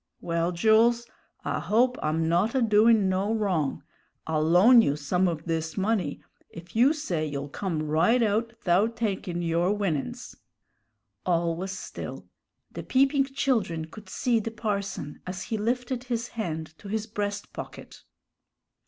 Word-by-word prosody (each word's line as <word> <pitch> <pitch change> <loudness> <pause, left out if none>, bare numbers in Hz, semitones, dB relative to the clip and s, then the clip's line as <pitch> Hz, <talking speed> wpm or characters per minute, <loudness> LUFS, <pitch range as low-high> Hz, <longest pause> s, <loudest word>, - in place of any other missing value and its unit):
"Well, 170 0 -1
Jools, 225 +6 +4 0.4
I - - -1
hope 245 +4 +2
I'm 160 +1 0
not 180 +9 +2
a 260 - +3
doin' 215 -1 +5
no 190 +3 0
wrong. 185 -10 -1 0.4
I'll 160 -1 0
loan 185 +10 +7
you 145 -9 +1
some 180 +6 +1
of 165 -3 -3
this 160 0 -2
money 200 0 -1 0.3
if 170 +3 -12
you 250 +5 +5
say 240 - -2
you'll 140 -1 -4
come 165 -1 -3
right 165 +11 +3
out 225 +2 +1
'thout 200 +6 +2
takin' 190 -6 -2
your 170 +2 +1
winnin's." 190 -9 -3 0.9
All 170 -2 +1
was 190 +3 -4
still. - - -7 0.5
The - - -6
peeping 275 +1 +3
children 230 - -1
could 210 +6 -13
see 240 -2 +1
the 220 - -3
parson 200 -9 -4
as 185 +1 -4
he 220 - -3
lifted 245 +3 -2
his 240 -1 -2
hand 160 -7 -5
to 205 - -11
his 215 +1 -2
breast 205 -2 -4
pocket. - - -9
200 Hz, 150 wpm, -27 LUFS, 170-230 Hz, 0.9 s, loan